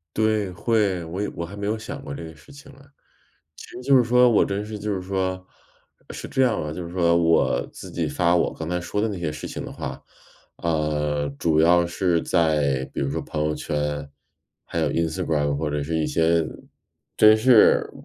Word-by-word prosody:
对， 110 -3 +1
会， 100 -1 0
我 85 +5 -5
也 105 - -2
我 85 - -4
还 90 +4 -10
没 100 0 -4
有 110 +2 0
想 110 - -7
过 70 - -6
这 85 - -7
个 80 -1 -10
事 75 - -18
情 140 0 -14
啊。 140 - -18 0.8
其 - - -11
实 - - -9
就 135 +1 +4
是 125 - +6
说 125 +1 +4
我 115 - +4
真 100 +1 -3
是 105 0 -7
就 105 +1 -3
是 95 - -2
说 95 0 -2 0.7
是 - - -7
这 130 - 0
样 125 -4 +2
的， 75 - -4
就 90 - -6
是 85 - -9
说 85 -2 +3
我 80 -7 +2
自 - - -10
己 - - -2
发 85 -1 +1
我 90 - +1
刚 80 0 -6
才 90 0 -1
说 95 +4 -3
的 110 - +1
那 100 -4 -4
些 85 -3 -2
事 75 0 -7
情 - - -6
的 - - -7
话。 - - -6 0.5
呃， 75 -2 -1
主 80 -2 +1
要 85 +2 +5
是 85 -1 0
在 75 -6 +1
比 - - -4
如 70 - -1
说 - - -2
朋 75 - -4
友 75 0 0
圈， 75 -2 -3 0.6
还 - - -5
有 75 -2 +1
Instagram 80 -3 0
或 75 +1 -2
者 75 0 -2
是 80 +3 -2
一 75 - 0
些 80 0 +2 0.7
真 110 0 +7
是 115 0 +5
85 Hz, 255 characters per minute, -23 LUFS, 75-105 Hz, 0.8 s, 真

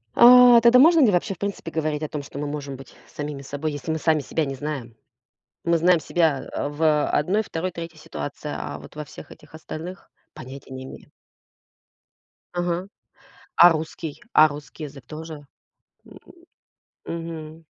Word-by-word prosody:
А, 245 -1 +9
тогда 235 +2 +6
можно 330 +4 +7
ли 250 -8 +5
вообще 185 +3 0
в - - -15
принципе 200 -4 -4
говорить 155 -1 -2
о - - -1
том, 150 - -4
что 140 - -11
мы 145 - -3
можем 145 -2 -5
быть 135 +1 -13
самими 145 -1 -6
собой, 145 +3 -4
если 145 +2 -4
мы 160 - -1
сами 155 0 +2
себя 155 +2 -2
не 135 - -4
знаем? 135 -5 -5 0.7
Мы 170 0 +2
знаем 175 +1 +4
себя, 155 -2 0
а, 145 - -3
в 150 0 +2
1-2-3 170 -2 -2
ситуации, 150 -1 -6
а - - -5
вот - - -14
во 150 0 -6
всех - - -12
этих - - -16
остальных 165 +3 -8 0.2
понятия 130 +1 -10
не 130 0 -7
имеем. - - -12 1.4
Ага. 175 +1 -2 0.7
А 175 - +9
русский? 160 +1 -4
А 155 - +8
русский 145 +1 -9
язык 135 -4 -11
тоже? 155 0 -9 0.6
М. - - -14 0.9
Мгм. 165 -1 -7
155 Hz, 160 wpm, -24 LUFS, 145-170 Hz, 1.4 s, А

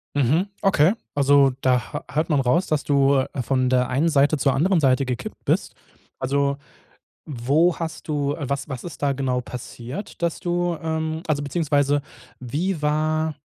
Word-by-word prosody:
Mhm. 150 - +2
Okay. 190 -2 +4 0.2
Also, 140 -1 +4
da 125 -1 +1
hö - - -2
hört 155 +4 0
man 145 -3 +3
raus, 135 +8 +2
dass 155 -2 0
du, 140 -1 +3
äh, 130 0 -2
von 130 0 +1
der 125 -1 +2
einen 145 +6 +2
Seite 145 0 +3
zur 135 -1 +2
anderen 170 +5 +2
Seite 135 -1 +3
gekippt 125 -2 -6
bist. - - 0 0.4
Also, 140 +1 0 0.7
wo 145 +6 +2
hast 165 -1 -6
du 145 -2 0
äh, 145 -4 -5
was 140 +1 -3
was 130 -3 -5
ist 165 -5 -9
da 140 -1 +2
genau 130 -2 -1
passiert, 125 - -8
dass 170 -1 -1
du 175 -1 -1
ähm, 160 0 -2
also 145 -2 0
beziehungsweise 145 -2 +1 0.4
wie 150 +7 -2
war 155 +1 0
145 Hz, 170 wpm, -23 LUFS, 135-160 Hz, 0.7 s, Okay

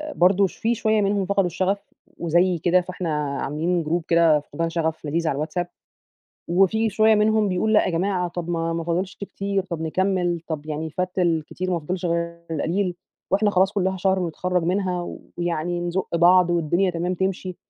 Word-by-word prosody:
برضو 190 +3 +4
في 230 +5 -1
شوية 220 -1 +1
منهم 200 -1 +1
فقدوا 195 0 +1
الشغف، 190 +3 -2 0.2
وزي 175 +2 +2
كده، 180 +3 +3
فإحنا 180 -2 -4 0.3
عاملين 165 +4 -1
جروب 165 +2 -1
كده 165 -3 +4
فقدان 160 +3 -4
شغف 160 -2 -2
لذيذ 165 +2 -1
على 140 - +1
الواتساب، 155 +4 -2 0.8
وفي 195 +5 +3
شوية 220 +2 +4
منهم 215 0 +3
بيقول: 195 +4 0
"لأ 210 - +5
يا - - 0
جماعة 180 +1 0
طب 175 -1 -6
ما 165 -1 -1
ما 165 0 -3
فاضلش 180 +3 -2
كتير 200 -1 -3
طب 170 -4 -5
نكمل، 175 +1 0
طب 155 -2 -4
يعني 155 +1 -4
فات 185 +3 -3
الكتير 175 +1 0
ما 175 - +1
فاضلش 180 +4 -4
غير 170 0 -2
القليل، 175 +4 -1 0.4
وإحنا 205 +2 +3
خلاص 190 0 +3
كلها 190 -2 0
شهر 190 +1 +1
ونتخرج 180 +1 -1
منها، 180 0 -1 0.2
ويعني 175 0 -2
نزق 175 0 -2
بعض، 175 +1 +5
والدنيا 175 +3 +1
تمام 175 +2 -2
تمشي" 185 0 -2
180 Hz, 175 wpm, -23 LUFS, 170-190 Hz, 0.8 s, لأ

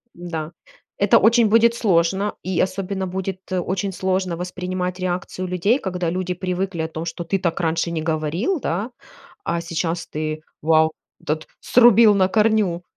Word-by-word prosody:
м-да, 165 -2 -5 0.5
это 200 0 +5
очень 230 +2 +5
будет 230 +2 +5
сложно, 190 -1 +1
и 185 -2 -2
особенно 190 0 -2
будет, 190 0 -4
э, 185 - +1
очень 190 +2 -2
сложно 185 -1 -1
воспринимать 180 0 -4
реакцию 185 0 -3
людей, 180 +7 +2
когда 180 -6 -2
люди 180 +1 -2
привыкли 180 -1 -3
о 160 - -2
том, 160 0 -6
что 170 +1 -4
ты 195 +4 0
так 175 -1 -1
раньше 165 0 0
не 160 -2 -2
говорил, 165 - -1
да, 205 +6 -2 0.5
а 170 0 -1
сейчас 165 0 -3
ты, 155 0 -4 0.2
вау, 160 0 +4 0.3
тот 155 +1 -2
срубил 235 -3 +6
на 185 -1 +4
корню, 210 -4 +2
180 Hz, 155 wpm, -21 LUFS, 170-195 Hz, 0.5 s, срубил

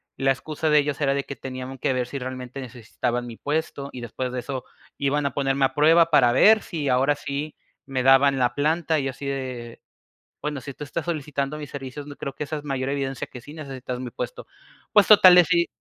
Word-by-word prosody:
la 135 0 +2
excusa 155 +3 -2
de 150 0 +6
ellos 145 0 -1
era 135 -1 +2
de 140 - -1
que 140 - -7
tenían 130 0 -7
que 130 - +1
ver 125 -1 -1
si 140 - -5
realmente 130 +1 -6
necesitaban 120 0 -3
mi 115 - -8
puesto, 145 -2 -3
y 125 - -7
después 125 +2 -4
de 125 - -3
eso 130 0 -5 0.3
iban 140 +1 0
a 140 - -1
ponerme 135 -1 +1
a 130 - -1
prueba 165 +3 +5
para 125 -5 +5
ver 215 - +6
si 155 -6 -4
ahora 135 +3 +3
sí 145 +1 -5 0.3
me 130 -2 -1
daban 135 +1 +5
la 125 -1 +1
planta 155 +2 +1
y 135 - -2
así 135 +1 -6
de: 130 -4 -5 0.6
"Bueno, 150 -2 -3
si 140 -1 -8
tú 150 - -10
estás 165 +2 -4
solicitando 150 -3 -3
mis 145 -2 -8
servicios, 140 +1 -7
n 145 - -8
creo 140 - -6
que 150 - -4
esa 155 +2 -4
es 145 - -11
mayor 135 -2 -2
evidencia 135 -2 -2
que 125 - -10
sí 145 - -12
necesitas 130 -4 -6
mi 125 -2 -5
puesto". - - -6 0.5
Pues 210 -3 +6
total 185 -4 +9
decidí, 170 -1 +5
140 Hz, 220 wpm, -24 LUFS, 130-150 Hz, 0.6 s, total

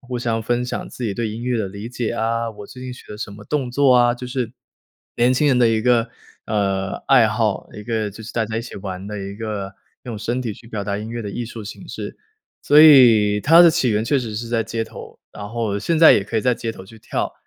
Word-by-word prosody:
互 125 -2 -5
相 115 -2 -1
分 120 +2 0
享 125 - -5
自 125 - -7
己 105 - -1
对 115 0 -2
音 110 +2 -6
乐 125 -2 0
的 100 - -2
理 100 +3 -8
解 120 -2 -3
啊， 115 0 -1
我 105 -2 -11
最 125 - -11
近 130 - -6
学 125 - -12
了 105 - -9
什 105 - -5
么 105 +1 -12
动 135 -3 -2
作 135 0 +4
啊。 120 -1 +4
就 125 +1 -8
是， 125 -2 -3 0.6
年 120 +2 +3
轻 150 +3 +2
人 130 -3 +3
的 120 - +5
一 110 -1 +1
个， 120 -1 +3 0.4
呃， 95 -3 -1
爱 125 -5 +5
好。 110 -1 -1
一 105 - -8
个 110 -3 -2
就 110 +3 -11
是 120 - -9
大 115 -1 0
家 110 - -4
一 115 - -2
起 125 - -10
玩 95 -1 -6
的 105 0 -5
一 100 +1 -6
个 105 -3 -5 0.3
用 115 -4 -6
身 120 +4 -2
体 115 -3 -3
去 115 - -15
表 105 -3 -5
达 100 0 -2
音 110 +1 -6
乐 120 0 -4
的 105 - -5
艺 120 +3 -4
术 115 -1 -8
形 105 - -9
式。 - - -7 0.5
所 150 +1 +6
以 115 -9 +7
它 165 +9 +7
的 170 - +7
起 130 -5 +1
源 105 0 0
确 140 +4 +2
实 115 -4 -5
是 115 +2 -5
在 115 -1 0
街 115 -1 -3
头， 110 - -10
然 105 -1 -8
后 110 -3 -2
现 165 +11 0
在 160 0 +8
也 100 - +2
可 110 +2 -4
以 - - +2
在 125 +3 +2
街 115 -1 -4
头 95 - -11
去 110 +3 -15
跳。 - - -3
115 Hz, 285 characters per minute, -21 LUFS, 105-125 Hz, 0.6 s, 在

